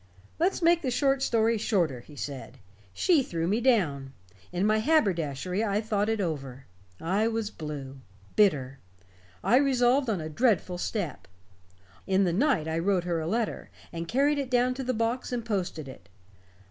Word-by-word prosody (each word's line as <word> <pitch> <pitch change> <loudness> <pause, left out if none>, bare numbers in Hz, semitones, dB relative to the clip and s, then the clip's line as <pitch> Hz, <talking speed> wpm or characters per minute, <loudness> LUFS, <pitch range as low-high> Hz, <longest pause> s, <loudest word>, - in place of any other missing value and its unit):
"Let's 355 +1 +1
make 340 0 +4
the 260 - -1
short 270 +1 +1
story 230 -3 +2
shorter," 170 - 0
he 145 +5 -15
said. 135 -2 -7 0.3
"She 320 - +3
threw 165 -9 -3
me 210 +6 +1
down. 150 - +1 0.4
In 180 +2 0
my 215 +1 +3
haberdashery 185 - +1
I 205 -2 +1
thought 215 -1 0
it 225 -1 0
over. 140 -7 -4 0.3
I 195 +6 +1
was 225 -2 -2
blue, 145 -4 -7 0.4
bitter. 140 -11 +2 0.6
I 245 - +4
resolved 260 -1 +3
on 205 -5 0
a 155 - -5
dreadful 180 0 +1
step. 195 -4 -3 0.8
In 190 0 +3
the 175 -3 +1
night 215 - +2
I 160 +1 -1
wrote 185 0 +1
her 175 -2 -1
a 160 - -3
letter, 225 +4 -2 0.2
and 165 0 -5
carried 285 - +2
it 270 -2 -3
down 250 0 +2
to 265 +1 -5
the 255 -1 -1
box 230 +4 -1
and 240 -2 -3
posted 180 -9 -3
it. 130 - -12
205 Hz, 170 wpm, -28 LUFS, 165-245 Hz, 0.8 s, make